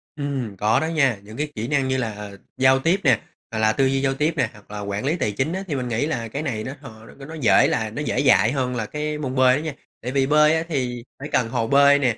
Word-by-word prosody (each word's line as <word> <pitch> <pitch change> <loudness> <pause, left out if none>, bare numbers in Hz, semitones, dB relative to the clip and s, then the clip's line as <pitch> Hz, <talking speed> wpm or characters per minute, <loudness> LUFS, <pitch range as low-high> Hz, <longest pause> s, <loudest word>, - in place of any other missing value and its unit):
Ừm, 135 -8 -4
có 105 +4 +2
đó 160 - -1
nha. 140 -9 +2
Những 110 +2 -11
cái 150 0 -3
kỹ 110 +2 -3
năng 140 -2 +1
như 130 - 0
là 105 -4 -4 0.3
giao 130 0 +4
tiếp 165 +8 +2
nè, 130 -7 +4 0.3
hoặc 110 - -3
là 110 0 +3
tư 135 - +2
duy 135 0 +1
giao 135 -1 +1
tiếp 150 +4 0
nè, 130 - +1
hoặc 105 -1 -17
là 105 - -5
quản 100 +2 -4
lý 155 +5 +1
tài 105 -11 -1
chính 130 - -1
á, 190 - -3
thì 150 - -2
mình 125 -2 -3
nghĩ 120 +4 0
là 120 -7 -3
cái 140 +6 -4
này 115 -8 -3
nó 130 - -5
hò 110 0 -12
nó 135 +4 -12
nó 160 - -9
dễ 135 -10 +4
là 110 -1 -1
nó 130 +8 -5
dễ 150 - -1
dạy 115 -5 +4
hơn 130 -2 -1
là 115 -3 -2
cái 150 +5 -4
môn 135 -3 -4
bơi 130 -1 +5
á 145 - -2
nha. 155 -2 -4 0.3
Tại 125 - -4
vì 135 0 +1
bơi 150 +1 +5
á, 160 - 0
thì 125 -5 -2 0.2
phải 140 - -6
cần 115 -3 +1
hồ 115 -2 -1
bơi 140 +2 +5
nè 125 -5 +1
130 Hz, 290 wpm, -22 LUFS, 115-145 Hz, 0.3 s, bơi